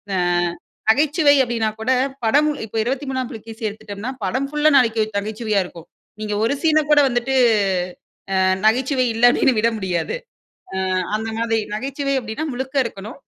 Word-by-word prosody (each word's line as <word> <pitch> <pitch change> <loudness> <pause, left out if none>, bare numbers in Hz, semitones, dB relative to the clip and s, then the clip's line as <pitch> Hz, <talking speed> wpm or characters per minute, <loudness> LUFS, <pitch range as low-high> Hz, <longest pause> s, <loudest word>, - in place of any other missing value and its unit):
அ - - +1 0.7
நகைச்சுவை 295 +3 +3
அப்படின்னா 230 -2 -1
கூட 240 +4 0 0.3
படம் 290 +7 +4 0.2
இப்ப 220 - -13
23ஆம் 260 0 -2
புலிகேசி 225 0 -8
எடுத்துட்டோம்னா, 215 +3 -7
படம் 255 +8 -1
ஃபுல்லா 300 +1 +3
நாகி 230 -4 +3 0.2
நகைச்சுவையா 215 0 -1
இருக்கும். 170 -2 -12 0.3
நீங்க 210 -1 -3
ஒரு 230 - +2
சீன்ன 310 -2 +4
கூட 300 -1 +6
வந்துட்டு, 250 +2 -1 1.0
அ 190 - +3 0.2
"நகைச்சுவை 255 +4 +2
இல்ல." 230 +2 +1
அப்படின்னு 265 - +3
விட 230 +2 +3
முடியாது. 190 - -2 0.7
அ - - -2 0.3
அந்த 220 +1 -3
மாதிரி. 225 -1 0
நகைச்சுவை 275 +4 -2
அப்படின்னா, 235 +6 -5
முழுக்க 265 +2 -5
இருக்கணும். 215 0 -7
235 Hz, 145 wpm, -21 LUFS, 220-270 Hz, 1.0 s, கூட